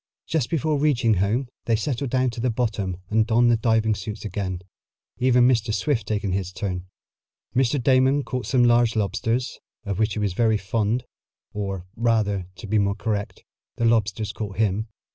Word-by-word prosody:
Just 145 -5 -1
before 155 -2 0
reaching 130 -6 +3
home 105 +7 +1 0.2
they 115 - +2
settled 130 +4 -2
down 130 0 +1
to 115 - -8
the 125 - +1
bottom 105 -6 -1
and 110 0 +3
donned 120 +1 +4
the - - +5
diving 110 -1 +2
suits 105 +1 -6
again, 95 -3 -3 0.6
even 125 -1 +5
Mr. 115 -3 +2
Swift 115 -2 0
taking 105 -2 -1
his 95 -1 -2
turn. 90 -2 -4 0.7
Mr. 130 +2 +2
Damon 130 +2 +3
caught 125 -2 -4
some 130 -3 +3
large 120 -1 +4
lobsters, 115 +4 -1 0.2
of 100 -2 -3
which 110 -1 +1
he - - -3
was 100 -3 0
very 110 +1 +2
fond, 110 +4 -1 0.5
or, 95 -3 -4
rather, 105 -5 +1
to - - -9
be 105 +1 +1
more 100 0 +1
correct, 105 -2 -3 0.3
the 115 - -1
lobsters 110 -2 +1
caught 105 -3 -6
him. 110 0 +1
110 Hz, 175 wpm, -24 LUFS, 100-120 Hz, 0.7 s, the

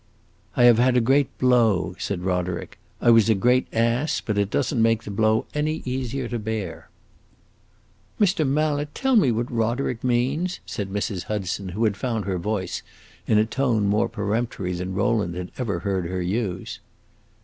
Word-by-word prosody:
"I 125 - +5
have 120 -2 +7
had 125 0 +4
a - - +6
great 135 +4 +2
blow," 120 -7 +2
said 90 -3 -3
Roderick. 90 -1 -2 0.2
"I 120 - +5
was 115 -1 +5
a 110 - +5
great 125 +6 +2
ass, 115 +6 +1
but 105 - -3
it 100 -1 +1
does 145 +6 0
n't 120 - +1
make 115 0 +2
the 105 - -6
blow 110 +2 +2
any 150 +1 -1
easier 130 0 -3
to 120 - -2
bear." 105 -5 -5 1.3
"Mr. 190 -6 +3
Mallet, 145 +1 0
tell 265 -1 +1
me 190 - +5
what 120 +3 -2
Roderick 115 +1 -1
means!" 130 +9 0
said 100 -2 -4
Mrs. 100 -2 -3
Hudson, 100 -2 -3
who 105 +6 -2
had 105 -3 +2
found 115 -3 -2
her 95 -2 -2
voice, 100 +1 -2 0.5
in 110 - +3
a 105 - +4
tone 115 -3 0
more 105 +4 +2
peremptory 105 -3 -2
than 90 +1 -4
Rowland 100 -4 0
had 90 0 -6
ever 100 -9 -2
heard 95 -2 -1
her 90 +1 -3
use. 95 -1 -3
115 Hz, 175 wpm, -24 LUFS, 100-125 Hz, 1.3 s, have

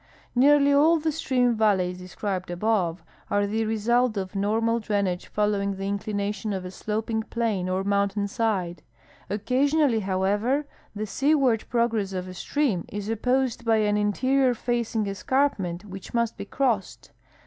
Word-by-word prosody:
Xearl}^ 280 +2 +5
all 320 +4 +5
the 315 +1 0
stream 250 -5 +1
A^alleys 190 -5 +2
described 185 0 -4
above 175 -2 0 0.3
are 205 0 +2
the 220 +2 -1
result 225 +2 +1
of 190 0 -4
normal 225 +4 +1
drainage 200 -4 -1
following 205 -1 0
the 195 0 -5
inclination 205 0 -2
of 190 -1 -4
a 180 - -6
sloping 220 +3 -2
plain 220 -5 -2
or 185 +1 0
mountain 200 0 0
side. 200 -6 -1 0.5
Occasionally, 255 +3 +2
hoAveA'er, 205 +9 0 0.3
the 215 +1 -3
seaward 270 -1 +2
progress 225 -5 0
of 185 0 -4
a 185 - -7
stream 225 - -1
is 205 +1 -5
opposed 250 +1 0
by 225 -1 +3
an 210 -1 +2
interior 255 +5 +2
facing 235 -2 -1
escarpment 200 -3 -1
Avhich 195 +3 -9
must 235 -1 +1
he - - -4
crossed. 230 -4 -2
215 Hz, 145 wpm, -25 LUFS, 195-240 Hz, 0.5 s, Xearl}^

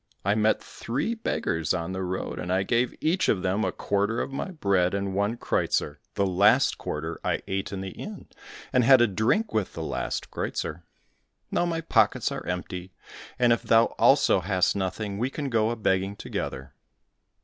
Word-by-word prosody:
I 100 - +3
met 110 0 +2
three 130 - -3
beggars 80 - -1
on 85 0 -3
the 95 0 -3
road, 95 0 -3
and 90 - -4
I 95 +1 +2
gave 120 +4 +1
each 175 +4 +1
of 95 - +1
them 95 +3 +1
a - - 0
quarter 100 +3 0
of - - -3
my 135 - -3
bread, 100 - +1
and 100 -1 -2
one 100 +4 0
kreuzer. 75 -9 -1 0.2
The 100 - +2
last 95 +3 +4
quarter 80 +2 -4
I - - -1
ate 95 0 -2
in 95 -1 -4
the 95 -1 -5
inn, - - -8 0.5
and 125 - +4
had 130 +2 +7
a - - +7
drink 115 - +1
with 110 -3 -1
the 80 - -5
last - - -3
kreuzer. 80 +3 -3 0.7
Now 175 - +1
my 165 -1 -1
pockets 165 - +2
are - - -4
empty, 90 +1 -5 0.4
and 120 -1 +4
if 115 - -1
thou 115 0 +4
also - - +5
hast 95 +1 +1
nothing 100 +1 -3
we 125 +3 0
can 145 0 -4
go 110 -1 +2
a 120 - -1
begging 95 -2 0
together." 65 -7 -5
100 Hz, 185 wpm, -26 LUFS, 95-115 Hz, 0.7 s, had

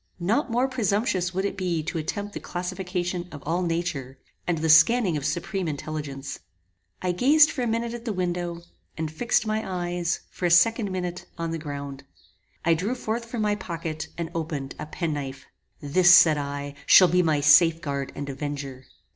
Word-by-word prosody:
Not 220 - 0
more 245 +3 +1
presumptuous 205 -6 0
would 190 +2 -2
it 200 - -2
be 175 -4 -1
to 165 +1 -3
attempt 205 +6 -4
the - - -5
classification 180 -1 -4
of 145 -2 -9
all 170 +4 0
nature, 165 -6 -3 0.3
and 175 -2 +1
the 160 +1 -1
scanning 180 +4 +5
of 145 -1 -1
supreme 175 +4 -2
intelligence. 145 -2 -5 0.6
I 180 - +1
gazed 290 - +5
for 265 - -4
a 240 - 0
minute 230 +1 -1
at 240 0 -8
the 230 - -1
window, 175 -2 -3 0.3
and 160 -1 -3
fixed 225 +6 +1
my 215 0 0
eyes, 175 -2 -2
for 180 - -1
a - - +1
second 205 +5 +4
minute, 180 -1 -4
on 165 -1 -3
the 165 - -3
ground. 140 -2 -6 0.6
I 165 - +5
drew 195 +10 -1
forth 230 -1 -3
from 230 -1 -3
my 210 0 +2
pocket, 165 -5 -5
and 170 -1 -4
opened, 155 -5 -4
a - - -5
penknife. 145 -5 -4 0.4
This, 175 +5 +4
said 160 -4 +7
I, 145 0 -4 0.4
be 180 0 +4
my 155 -4 +2
safe 160 +3 +6
guard 140 -3 -4
and 145 - -5
avenger. 140 -2 -5
175 Hz, 180 wpm, -25 LUFS, 150-195 Hz, 0.6 s, said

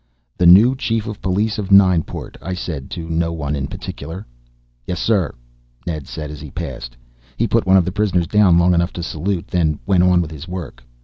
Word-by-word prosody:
"The 90 - +3
new 105 +9 +7
Chief 115 -4 -1
of 105 -2 -7
Police 105 +5 0
of 100 -1 -4
Nineport," 95 -4 +3
I 95 - -4
said 80 -7 -5
to 85 -2 -6
no 80 0 -1
one 75 -3 -3
in 70 -1 -3
particular. 80 +9 -7 0.6
"Yes, 90 - -3
sir," 100 -8 +1 0.5
Ned 80 -5 -4
said 75 -1 -6
as 75 -1 -9
he 75 - -8
passed. - - -7 0.4
He 115 - +1
put 115 -1 +1
one 95 +1 +6
of 90 - +3
the 90 - -2
prisoners 95 -3 +1
down 95 -2 +4
long 90 +1 +4
enough 85 +1 +1
to 85 - -5
salute, 85 +3 -3
then 80 -4 +1
went 95 -2 +3
on 90 -1 +4
with 80 -3 -2
his 80 +2 -9
work. 85 -9 -7
90 Hz, 205 wpm, -19 LUFS, 80-100 Hz, 0.6 s, new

